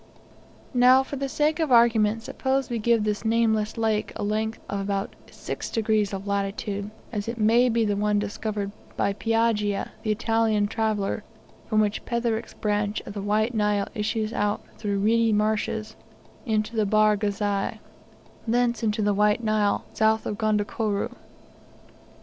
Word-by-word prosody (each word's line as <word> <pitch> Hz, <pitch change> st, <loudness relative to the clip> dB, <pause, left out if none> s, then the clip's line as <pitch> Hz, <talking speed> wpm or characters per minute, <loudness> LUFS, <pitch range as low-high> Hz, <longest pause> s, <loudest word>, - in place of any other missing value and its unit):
Now, 255 Hz, +1 st, +6 dB
for 275 Hz, -, -6 dB
the 275 Hz, 0 st, -3 dB
sake 305 Hz, +3 st, +1 dB
of 315 Hz, -4 st, 0 dB
argument, 225 Hz, -2 st, +4 dB
suppose 265 Hz, +1 st, -1 dB
we 235 Hz, -, -1 dB
give 230 Hz, 0 st, +2 dB
this 210 Hz, 0 st, -1 dB
nameless 220 Hz, -1 st, +1 dB
lake 220 Hz, -2 st, 0 dB
a -, -, -4 dB
length 215 Hz, +2 st, -1 dB
of 200 Hz, 0 st, -3 dB, 0.4 s
6 -, -, -6 dB
degrees 215 Hz, -3 st, +1 dB
of 195 Hz, 0 st, -5 dB
latitude, 200 Hz, 0 st, -2 dB, 0.2 s
as 205 Hz, -1 st, -3 dB
it 230 Hz, +1 st, -3 dB
may 235 Hz, +3 st, +4 dB
be 230 Hz, -1 st, +2 dB
the 205 Hz, -1 st, 0 dB
one 210 Hz, +1 st, +1 dB
discovered 205 Hz, 0 st, -3 dB, 0.3 s
by 200 Hz, -, +1 dB
Piaggia, 220 Hz, -2 st, 0 dB
the 220 Hz, -, -4 dB
Italian 220 Hz, -1 st, +2 dB
traveller, 215 Hz, -1 st, -1 dB, 0.4 s
from 215 Hz, -1 st, +3 dB
which 210 Hz, 0 st, -1 dB
Petherick's 235 Hz, -2 st, -2 dB
branch 210 Hz, 0 st, -1 dB
of -, -, -9 dB
the 200 Hz, -, -4 dB
White 215 Hz, +4 st, +1 dB
Nile 210 Hz, -2 st, +1 dB
issues 220 Hz, 0 st, -2 dB
out 205 Hz, -3 st, 0 dB, 0.2 s
through 205 Hz, -2 st, -1 dB
reedy 225 Hz, +3 st, +3 dB
marshes, 215 Hz, +1 st, 0 dB, 0.5 s
into 215 Hz, 0 st, 0 dB
the 215 Hz, -2 st, +1 dB
Bahr 215 Hz, +1 st, +4 dB
Ghazal, 205 Hz, -1 st, -1 dB, 0.7 s
thence 240 Hz, 0 st, +1 dB
into 215 Hz, -1 st, 0 dB
the 205 Hz, 0 st, +2 dB
White 210 Hz, +3 st, +2 dB
Nile, 215 Hz, -2 st, +1 dB
south 220 Hz, 0 st, +2 dB
of 210 Hz, -, -2 dB
Gondokoro. 210 Hz, -1 st, -1 dB
215 Hz, 150 wpm, -25 LUFS, 205-230 Hz, 0.7 s, Now